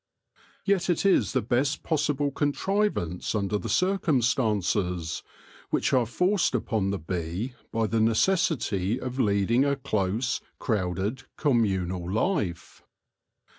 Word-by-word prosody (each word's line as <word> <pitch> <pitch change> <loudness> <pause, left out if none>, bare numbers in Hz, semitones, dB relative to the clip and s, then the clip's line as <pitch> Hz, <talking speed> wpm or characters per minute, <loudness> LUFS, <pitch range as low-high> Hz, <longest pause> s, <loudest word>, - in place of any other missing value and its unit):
Yet 195 -2 +1
it 175 +2 +1
is 155 - +3
the - - +1
best 130 +6 0
possible 150 -2 0
contrivance 145 - -1
under 105 0 0
the - - -5
circumstances, 110 - +1 0.5
which - - 0
are 125 -3 +3
forced 180 - +1
upon 110 -4 0
the 100 - -1
bee 90 +7 -4 0.2
by 115 0 +1
the 110 +1 +1
necessity 115 - +1
of 130 0 -5
lead 100 -3 +2
ing 125 +3 +4
a 140 0 +2
close, 115 -2 -1 0.2
crowded, 100 +3 -2
communal 95 - 0
life. 105 - -1
115 Hz, 120 wpm, -27 LUFS, 95-145 Hz, 0.5 s, ing